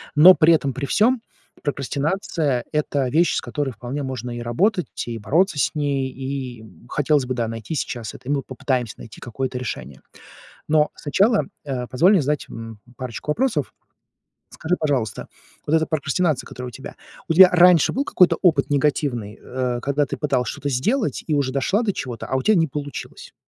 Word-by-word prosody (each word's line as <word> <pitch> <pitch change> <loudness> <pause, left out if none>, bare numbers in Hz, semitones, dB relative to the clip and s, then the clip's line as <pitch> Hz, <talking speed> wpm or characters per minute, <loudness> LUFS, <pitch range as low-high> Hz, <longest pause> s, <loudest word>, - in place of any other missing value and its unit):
но 180 +5 +9
при 160 +2 +5
этом 140 -4 +1
при 140 +2 -3
всём 225 - +2 0.4
прокрастинация 145 - -1
это 145 -3 0
вещь, 170 +6 +3
с - - 0
которой 145 -3 -3
вполне 130 +4 -5
можно 125 -2 -5
и 120 - -5
работать, 180 - 0
и 115 -1 -4
бороться 160 - +1
с 140 - +1
ней. 140 -3 -1
И 130 -3 -5 0.2
хотелось 145 -2 +1
бы, 130 - -2
да, 120 -2 -1
найти 115 +7 -6
сейчас 120 -6 -4
это, 125 +2 -10
и - - +1
мы 140 -2 0
попытаемся 125 -3 -2
найти 115 - -11
какое-то 125 +2 -4
решение. 70 - -6 0.7
Но 150 -1 +3
сначала, 200 +9 +2 0.2
э, 130 -3 -3
позволь 165 +9 +4
мне 190 - +5
задать, 150 +1 -1
м, 115 -1 -8 0.2
парочку 130 +3 -5
вопросов. 170 - 0 0.8
Скажи, 170 +3 -2
пожалуйста, 130 -10 -1 0.4
вот 155 - -1
эта 160 0 +2
прокрастинация, 155 0 0
которая 125 0 -7
у - - -13
тебя, 135 - -9 0.3
у 165 - +3
тебя 185 +2 +10
раньше 180 -2 +5
был 275 - 0
какой-то 180 - +4
опыт 175 -4 +3
негативный, 140 -7 0
э, 125 -1 -2
когда 140 +1 +1
ты - - -5
пыталась 135 -4 0
что-то 145 - -5
сделать 210 - 0
и 155 - 0
уже 135 -2 0
дошла 165 - +1
до 200 -4 0
чего-то, 120 -4 -5
а - - -2
у 130 - +1
тя 215 - +4
не 165 -2 +3
получилось? 145 -1 -7
140 Hz, 180 wpm, -22 LUFS, 125-160 Hz, 0.8 s, тебя